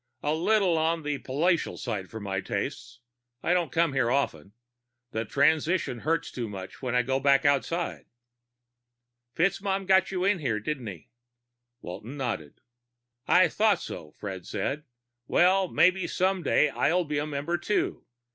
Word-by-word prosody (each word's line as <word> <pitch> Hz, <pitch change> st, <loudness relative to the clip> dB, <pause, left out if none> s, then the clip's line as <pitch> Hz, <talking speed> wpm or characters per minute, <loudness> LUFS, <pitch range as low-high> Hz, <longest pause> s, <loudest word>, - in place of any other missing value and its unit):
"A 150 Hz, -, +1 dB
little 180 Hz, 0 st, +2 dB
on 165 Hz, 0 st, 0 dB
the 145 Hz, -1 st, -2 dB
palatial 165 Hz, +6 st, 0 dB
side 105 Hz, -7 st, -4 dB
for 110 Hz, -, -7 dB
my 95 Hz, -2 st, -3 dB
tastes. 120 Hz, +4 st, -4 dB, 0.4 s
I 175 Hz, -, +2 dB
don't 175 Hz, -6 st, +1 dB
come 165 Hz, -3 st, +2 dB
here 130 Hz, -3 st, +2 dB
often. 105 Hz, -, -1 dB, 0.6 s
The 110 Hz, +1 st, -2 dB
transition 155 Hz, -, +1 dB
hurts 160 Hz, +5 st, -1 dB
too 120 Hz, -3 st, -4 dB
much 95 Hz, -2 st, -8 dB
when 125 Hz, -2 st, -2 dB
I 125 Hz, -, +4 dB
go 130 Hz, +2 st, 0 dB
back 140 Hz, 0 st, +3 dB
outside." 145 Hz, +5 st, 0 dB, 1.3 s
"FitzMaugham 195 Hz, +2 st, 0 dB
got 190 Hz, 0 st, +4 dB
you 185 Hz, -1 st, -2 dB
in 195 Hz, -1 st, +2 dB
here, 120 Hz, -8 st, -1 dB
didn't 130 Hz, +1 st, -4 dB
he?" 90 Hz, -6 st, -9 dB, 0.7 s
Walton 110 Hz, +10 st, -7 dB
nodded. 110 Hz, -, -4 dB, 0.7 s
"I 185 Hz, +1 st, +6 dB
thought 210 Hz, -4 st, +2 dB
so," 80 Hz, -, -7 dB
Fred 95 Hz, -4 st, -7 dB
said. 140 Hz, +9 st, -3 dB, 0.4 s
"Well, 185 Hz, +2 st, +4 dB
maybe 185 Hz, +2 st, +3 dB
someday 185 Hz, -5 st, +2 dB
soon -, -, -12 dB
I'll 180 Hz, +2 st, +3 dB
be 150 Hz, -1 st, -1 dB
a 150 Hz, -, -2 dB
member 150 Hz, +4 st, -2 dB
too. 205 Hz, +4 st, -1 dB
150 Hz, 155 wpm, -27 LUFS, 120-175 Hz, 1.3 s, I